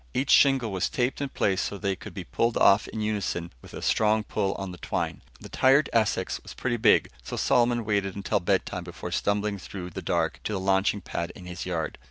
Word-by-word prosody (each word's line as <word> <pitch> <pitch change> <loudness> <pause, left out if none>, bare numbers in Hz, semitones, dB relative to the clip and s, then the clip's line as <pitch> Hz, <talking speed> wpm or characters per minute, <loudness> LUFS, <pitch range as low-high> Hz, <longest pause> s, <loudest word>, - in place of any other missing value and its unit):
Each 135 +1 +1
shingle 135 -6 +5
was 95 -1 0
taped 125 +2 -1
in 140 - -2
place 95 -6 0
so 100 - -3
they 100 -1 -1
could - - -11
be - - -5
pulled 115 - 0
off 100 +2 +5
in 110 - -5
unison 100 -5 -2
with - - -12
a - - -7
strong 110 0 +2
pull 95 -2 -1
on 95 -2 -5
the 90 - -10
twine. - - -3 0.2
The - - -10
tired 135 +3 +3
Essex 110 -2 +1
was - - -11
pretty 120 -2 -1
big, 110 - +4
so - - -6
Solomon 120 -1 +2
waited 100 -2 0
until 100 -1 0
bedtime - - -1
before - - -7
stumbling 100 0 0
through 90 -1 -7
the - - -6
dark 85 -2 0
to 110 - -2
the 95 - -1
launching 95 +1 +1
pad 85 -1 -4
in 90 - -11
his 90 0 -6
yard. 80 -4 -3
100 Hz, 220 wpm, -27 LUFS, 95-115 Hz, 0.2 s, shingle